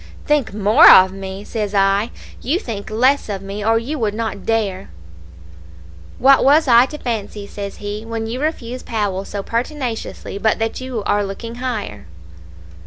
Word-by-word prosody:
"'Think 295 -4 +1
more 210 +9 +6
of 185 0 +8
me!' 195 0 -7
says 210 -1 -4
I; 195 +3 +2 0.3
'you 290 +8 0
think 225 - -6
less 255 +4 +2
of 195 -2 -4
me, 200 +1 -6
or 225 +2 +3
you 270 +6 -3
would 210 -3 -1
not 220 -3 -4
dare 205 -4 -1 0.6
' 80 0 -20
"'What 270 +1 +5
was 295 +3 +4
I 240 +1 +6
to 300 - -8
fancy,' 215 -5 -4
says 200 0 -7
he, 205 +1 -5
'when 225 0 -4
you 240 +4 -4
refuse 255 -5 -3
Powell 200 -4 -2
so 200 -1 -5
pertinaciously, 235 -4 -4
but 220 +1 +2
that 225 +3 -3
you 255 -5 -4
are 205 0 +1
looking 205 +4 -6
higher?' 215 - -4
220 Hz, 170 wpm, -19 LUFS, 200-245 Hz, 0.6 s, of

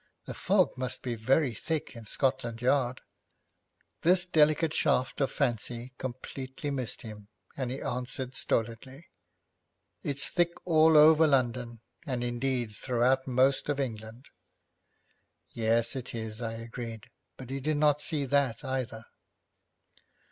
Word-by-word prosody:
The - - -6
fog - - +2
must 130 -1 -4
be 125 - -2
very 130 +4 +2
thick 155 +2 -4
in 115 -1 -10
Scotland 130 -3 -1
Yard.' 130 0 +1 1.0
This 180 +1 +5
delicate 155 -1 +3
shaft 130 +3 +1
of 135 - +1
fancy 120 -1 -2
completely 130 +2 -5
missed 130 -4 -3
him, 105 -2 -10 0.3
and 130 -3 -3
he 130 +2 -5
answered 125 +1 -3
stolidly, 130 +5 -1 0.9
'It's 140 +3 -1
thick 175 -1 +2
all 160 -2 +5
over 155 +1 +7
London, 120 -4 0 0.3
and, 125 -3 -2
indeed, 120 -2 -2
throughout 130 +3 +1
most 130 +3 +2
of 145 -1 0
England.' 115 -1 -5 1.2
'Yes, 115 +2 +1
it 125 -2 -6
is,' 110 0 -5
I 115 -1 -3
agreed, 115 -1 -7 0.3
but 130 -1 -9
he 135 - -2
did 150 +2 -1
not 150 -1 +3
see 150 -3 -2
that 140 -1 +1
either. 125 -4 -3
130 Hz, 130 wpm, -29 LUFS, 115-140 Hz, 1.2 s, over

